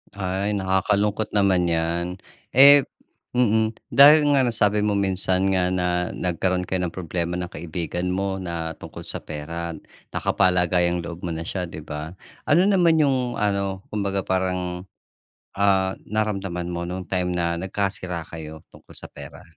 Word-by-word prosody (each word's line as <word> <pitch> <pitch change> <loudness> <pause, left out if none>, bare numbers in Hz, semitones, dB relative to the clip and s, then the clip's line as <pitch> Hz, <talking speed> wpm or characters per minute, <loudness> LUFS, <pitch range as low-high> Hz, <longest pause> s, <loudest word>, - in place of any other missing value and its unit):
Ay 100 +2 -2
nakakalungkot 100 +2 0
naman 95 -3 +3
'yan. 85 +1 0 0.5
Eh, 140 +1 +9 0.5
mm, 110 -2 +2 0.2
dahil 150 +2 +8
nga 135 - +4
nasabi 105 -2 +1
mo 105 -1 +1
minsan 95 0 +1
nga 90 -1 +2
na 90 -1 0
nagkaroon 90 +1 -1
kayo 95 0 -2
ng - - -10
problema 85 -1 -3
ng 90 -1 -5
kaibigan 85 +2 -4
mo 95 +1 -1
na 85 -2 -4
tungkol - - -9
sa - - -6
pera. 85 +2 -6 0.4
Nakapalagayang-loob 90 -2 +1
mo 90 - -4
na 80 - -4
siya, 90 -2 -3
'di 80 - -8
ba. 75 +3 -6 0.4
Ano 165 +5 +5
naman 175 -5 +4
'yong 130 -5 +1
ano, 100 -1 -1
kumbaga 100 -2 -1
parang, 90 -1 -2 0.7
ah 95 -1 +1
naramdaman 100 -5 -2
mo 85 0 -4
nung 90 +1 -5
time 90 -1 0
na 85 -1 -1
nagkasira 95 -2 -3
kayo 80 -1 -9
tungkol - - -17
sa - - -10
pera? - - -11
95 Hz, 145 wpm, -23 LUFS, 85-100 Hz, 0.7 s, Eh